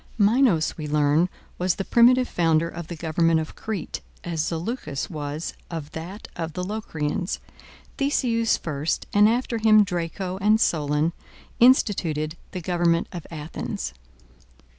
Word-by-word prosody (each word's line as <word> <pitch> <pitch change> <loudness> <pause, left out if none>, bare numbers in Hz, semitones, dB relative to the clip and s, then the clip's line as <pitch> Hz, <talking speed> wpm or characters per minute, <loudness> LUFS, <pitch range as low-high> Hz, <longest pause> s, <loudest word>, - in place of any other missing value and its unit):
Minos, 210 - +3
we 150 - -4
learn, 150 +3 +3 0.3
was 180 -1 +1
the 195 - -3
primitive 250 +2 +5
founder 165 -1 +2
of 170 -1 -7
the 170 - -6
government 165 0 +2
of 160 - -5
Crete, 215 -6 -4 0.2
as 165 -3 -1
Zaleucus 165 - -3
was 150 0 -4 0.2
of 160 -3 -6
that 175 +6 -7
of 165 -2 -4
the 180 - -3
Locrians. 180 -4 -3 0.6
Theseus 240 -5 +2
first, 150 -1 -2
and 210 +1 +6
after 235 0 0
him 215 -1 +6
Draco 180 0 -3
and 215 +2 +4
Solon, 150 -2 +1 0.5
instituted 170 - +3 0.2
the 185 - -5
government 170 -1 +1
of 175 -4 -7
Athens. 155 -1 -5
170 Hz, 135 wpm, -24 LUFS, 160-210 Hz, 0.6 s, and